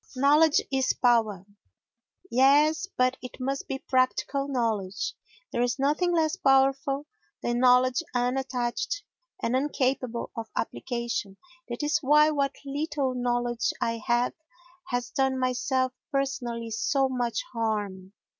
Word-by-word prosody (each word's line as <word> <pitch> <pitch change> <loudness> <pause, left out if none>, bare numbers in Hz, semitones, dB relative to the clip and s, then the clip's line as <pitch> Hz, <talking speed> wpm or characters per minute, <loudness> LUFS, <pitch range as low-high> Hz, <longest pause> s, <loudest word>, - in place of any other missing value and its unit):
Knowledge 295 +4 +5
is 265 -1 +2
Power 220 -6 +2 0.9
Yes, 295 +7 +4
but 255 +1 +2
it 250 - -9
must 270 +2 -3
be 270 - -2
practical 265 +2 0
knowledge. 225 -7 -1 0.4
There 240 - -1
is 245 +1 +1
nothing 300 +6 +1
less 320 -2 +2
powerful 270 +1 +2 0.4
than 240 0 0
knowledge 250 +2 +4
unattached, 250 - -1 0.4
and 240 - +1
incapable 260 -3 -1
of 225 -1 -5
application. 235 -5 -3 0.3
That 240 +4 -4
is 295 +1 +2
why 300 +2 +5
what 280 -2 0
little 280 -1 -2
knowledge 240 -1 0
I 230 -1 -1
have 240 +1 +2 0.5
has 245 -2 -2
done 265 0 +1
myself 255 0 0 0.2
personally 245 -5 -2
so 270 +5 +1
much 250 - -2
harm. 205 -4 -3
255 Hz, 120 wpm, -27 LUFS, 240-275 Hz, 0.9 s, Knowledge